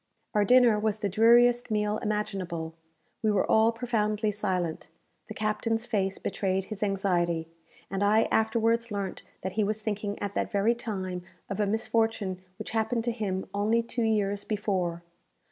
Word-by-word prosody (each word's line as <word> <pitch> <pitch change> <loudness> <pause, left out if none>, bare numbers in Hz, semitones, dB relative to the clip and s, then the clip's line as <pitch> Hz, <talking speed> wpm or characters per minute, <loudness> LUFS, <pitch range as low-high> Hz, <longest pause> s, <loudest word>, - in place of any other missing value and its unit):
Our 210 -2 +3
dinner 245 -2 +6
was 215 0 0
the 205 -2 -2
dreariest 240 +4 +5
meal 210 0 0
imaginable. 195 -6 -3 0.5
We 220 - +2
were 205 -2 +2
all 220 +1 +4
profoundly 220 -2 0
silent. 185 -7 -2 0.4
The 215 - -8
captain's 225 +2 -1
face 195 -5 -1
betrayed 190 0 -1
his 215 -1 -7
anxiety, 175 -5 0 0.4
and 195 0 -2
I 215 +2 +4
afterwards 230 +1 +2
learnt 200 -2 -3 0.2
that 190 - -2
he 215 +3 +1
was 215 +1 -2
thinking 205 -1 -2
at 200 -1 -4
that - - -1
very 205 +3 +3
time 190 -6 -4 0.3
of 195 - -3
a 205 - +2
misfortune 220 -3 0 0.2
which - - -6
happened 225 +1 0
to 235 - 0
him 200 -5 -2
only 215 +3 +2
two 235 +1 -2
years 205 -2 +1
before. 185 -6 -1
210 Hz, 160 wpm, -28 LUFS, 195-225 Hz, 0.5 s, dinner